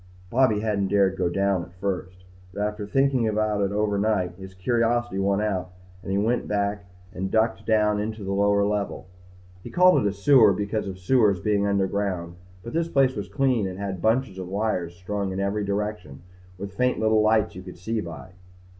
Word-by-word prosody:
Bobby 120 -5 +3
hadn't 105 -3 0
dared 100 -1 +2
go 90 -2 0
down 100 0 +1
at 85 0 -11
first. 90 -1 -4 0.3
But, 100 - -5
after 105 0 -3
thinking 135 +1 +2
about 105 -1 0
it 100 -1 0
overnight, 105 -3 0
his 95 +1 -11
curiosity 120 +1 0
won 100 0 +1
out 95 -4 -2 0.3
and 95 - -6
he 100 - +1
went 115 +4 0
back 100 0 -1 0.3
and 95 +1 -3
ducked 110 +1 0
down 105 -1 +2
into 110 0 -4
the 95 - -3
lower 100 0 +3
level. 105 -2 -2 0.6
He - - -9
called 180 -5 +5
it 105 - +2
a - - -2
sewer 105 +1 +5
because 100 +2 -2
of 95 -1 -6
sewers 100 0 +3
being 100 +1 +1
underground, 95 -3 -1 0.3
but 115 - -8
this 165 +1 0
place 135 -4 +2
was 100 0 -5
clean 130 -7 +1
and 90 0 -6
had 95 -3 -4
bunches 110 -3 +1
of 90 - -5
wires 95 -3 -2
strung 100 +2 -3
in 95 - -4
every 100 +2 -1
direction 100 -6 -4 0.3
and 100 +1 -6
faint 125 +6 0
little 110 0 +3
lights 110 0 +2
you 95 - -8
could 90 -1 -11
see 110 +5 -2
by. 85 +1 -9
100 Hz, 190 wpm, -25 LUFS, 95-110 Hz, 0.6 s, called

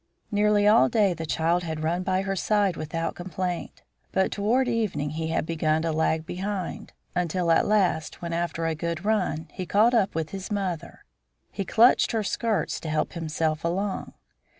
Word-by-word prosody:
Nearly 210 0 +3
all 170 -11 +6
day 205 -4 +3
the 165 -1 -6
child 165 +5 +1
had 160 -2 -4
run 170 +3 0
by 185 +1 0
her 195 0 -2
side 200 -1 +1
without 165 +2 -3
complaint. 180 0 -4 0.3
But 190 - +1
toward 235 +6 +1
evening 210 -12 -1
he 160 +1 -3
had 160 - -1
begun 160 -1 0
to 165 - 0
lag 160 0 0
behind, 190 0 -4 0.2
until 175 -1 0
at 165 - +4
last, 185 -7 +1
when, 170 -1 -4
after 170 -1 -2
a 165 - +1
good 170 +3 -4
run, 185 -7 0
he 185 - -5
caught 220 +6 +4
up 205 -7 +2
with 160 -1 -2
his 195 -1 -6
mother, 190 -6 -4 0.5
he 195 - -3
clutched 235 +6 +4
her 220 -1 +1
skirts 220 +1 -1
to 160 - -6
help 155 0 -1
himself 160 -1 -2
along. 190 +4 -2
175 Hz, 175 wpm, -26 LUFS, 160-205 Hz, 0.5 s, all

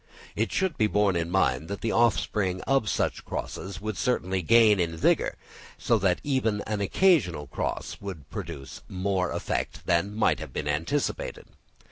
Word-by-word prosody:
It - - 0
should 190 -4 0
be 110 - +4
borne 105 -2 +2
in 85 0 -1
mind 80 -6 +1
that 100 +2 -5
the 115 - 0
offspring 100 -5 +1
of 135 -6 +1
such - - -1
crosses 95 -2 -5
would 110 -1 -4
certainly 95 -6 0
gain 110 +2 +5
in 80 -2 -1
vigour; - - +2 0.4
so 115 - +2
that 95 -2 +2
even 125 -7 0
an 105 -1 -3
occasional 100 - +3
cross - - -4
would 90 -8 -7
produce 85 -10 -7
more 95 -1 0
effect - - -3
than 90 +5 +1
might 110 - +2
have - - -7
been - - -3
anticipated. 80 - -2
100 Hz, 160 wpm, -27 LUFS, 85-110 Hz, 0.4 s, gain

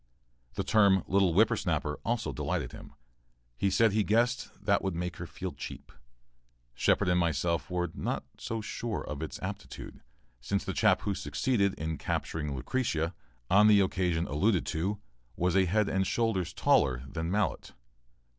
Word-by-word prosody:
The - - -1
term 100 -3 +4
"little 95 -2 +3
whipper 105 +7 +4
snapper" 75 0 -2
also 120 0 -1
delighted 75 -2 -2
him. - - -11 0.6
He 100 +11 +1
said 110 +3 +4
he 105 +1 +2
guessed 120 +3 +1 0.2
that 100 -1 +3
would 95 -3 -1
make 90 0 -3
her - - -6
feel - - -5
cheap. - - -9 0.8
Shepard - - +2
and 90 0 +3
myself 85 -2 0
were 90 -2 -1
not - - -3
quite - - -24
so 115 0 -3
sure 110 0 -4
of 75 0 -5
its 80 - -5
aptitude, - - -7 0.4
since 100 +11 -2
the 95 - -2
chap 105 -2 +3
who 100 - -1
succeeded 100 +1 0
in 80 -1 -4
capturing 75 -3 -2
Lucretia, 85 - -1 0.3
on 105 +6 +6
the 105 -1 +7
occasion 90 -3 0
alluded 90 +6 +1
to, 95 +6 -2 0.4
was 90 +1 +1
a 95 -1 +5
head 105 +3 +2
and 95 0 0
shoulders 110 -7 0
taller 65 -3 +2
than 80 +4 -4
Mallett. 105 +3 -1
95 Hz, 165 wpm, -30 LUFS, 80-105 Hz, 0.8 s, the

